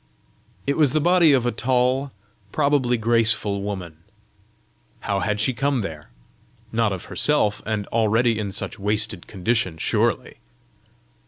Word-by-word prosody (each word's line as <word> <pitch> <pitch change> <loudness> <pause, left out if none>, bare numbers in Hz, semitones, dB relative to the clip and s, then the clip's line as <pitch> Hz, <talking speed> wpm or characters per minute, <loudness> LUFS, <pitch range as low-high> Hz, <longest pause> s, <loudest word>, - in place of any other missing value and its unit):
It 140 - 0
was 145 -4 +4
the 155 - +2
body 175 0 +4
of 130 -3 +2
a 120 - +1
tall, 130 +3 0 0.4
probably 140 -5 +1
graceful 110 -3 +2
woman. 95 -6 -6 1.0
How 100 -1 -1
had 105 +2 -1
she 120 +5 +1
come 135 +1 0
there? 80 -7 -7 0.6
Not 115 -2 +1
of 95 -2 -5
herself, 105 -9 +1
and 110 -2 -2
already 115 +1 +2
in 100 -2 -3
such 95 - -5
wasted 105 -2 -1
condition, 100 -3 -1
surely! - - -1
110 Hz, 135 wpm, -22 LUFS, 100-130 Hz, 1.0 s, was